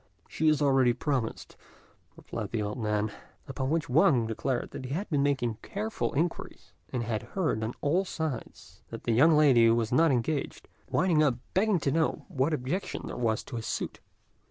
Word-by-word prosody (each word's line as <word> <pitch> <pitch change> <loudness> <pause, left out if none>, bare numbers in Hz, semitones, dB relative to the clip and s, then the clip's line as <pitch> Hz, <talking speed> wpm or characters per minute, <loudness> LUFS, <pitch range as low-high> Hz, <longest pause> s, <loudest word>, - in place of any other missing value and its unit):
"She 160 - -1
is 155 -1 +3
already 135 -3 +4
promised," 125 -2 -3 0.6
replied - - -6
the 110 -2 -2
old 105 +4 -4
man; 105 -1 0 0.4
upon 135 -1 -3
which 160 0 0
Wang 125 -3 +4
declared 120 +3 -3
he 130 - -6
had 200 +5 -3
been 145 -2 +2
making 130 -6 0
careful 220 +1 -3
inquiries, 165 +5 -3 0.2
and 125 -2 -2
had 110 -2 -2 0.2
heard, 155 - 0
on 110 +2 -3
all 170 +7 +2
sides, 160 -9 -6
that - - -8
the 115 - +1
young 150 +7 +5
lady 130 -7 +6
was 115 -1 +1
not 160 +6 +4
engaged, 135 +4 -2 0.2
winding 170 -3 +3
up 140 -5 +3
by - - -15
begging 200 -1 +2
to 140 - +1
know 160 +2 0
what 135 +4 0
objection 150 +6 -3
there - - -6
was 115 -3 0
to 120 - -7
his 115 - -5
suit. - - -3
135 Hz, 180 wpm, -29 LUFS, 115-160 Hz, 0.6 s, lady